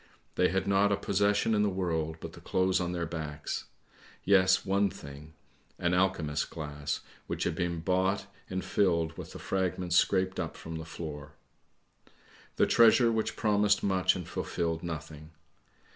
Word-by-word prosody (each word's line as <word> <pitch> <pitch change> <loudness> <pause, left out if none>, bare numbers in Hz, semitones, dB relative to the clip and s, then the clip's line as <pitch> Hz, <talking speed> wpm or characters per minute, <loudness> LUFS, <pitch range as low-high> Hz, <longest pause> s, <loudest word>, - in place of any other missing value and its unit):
They 90 - +3
had 95 0 0
not 100 +1 +3
a 100 - +2
possession 100 +2 +1
in 105 - +3
the 105 - +3
world 80 -4 -2
but - - -7
the - - -12
clothes 95 0 +1
on 90 -1 -1
their 85 -1 -2
backs; 80 -2 -5 0.6
yes, 95 -1 +4
one 100 +1 +2
thing 70 -1 -11 0.2
— - - -36
an 85 0 0
alchemist's 85 -5 +1
glass 75 -2 -5 0.3
which - - -2
had - - 0
been 85 -1 -2
bought 95 +3 +1 0.2
and 95 0 -3
filled 85 -5 +1
with - - -8
the - - -7
fragments 90 -2 -1
scraped 95 0 +2
up - - -4
from 80 0 -7
the 80 - -6
floor. 75 -2 -7 1.2
The - - +4
treasure 115 +1 +5
which 110 -1 -1
promised 105 -1 +2
much 95 -2 +2
and 90 -3 -6
fulfilled 85 -1 -2
nothing. 80 -2 -7
90 Hz, 160 wpm, -30 LUFS, 80-95 Hz, 1.2 s, treasure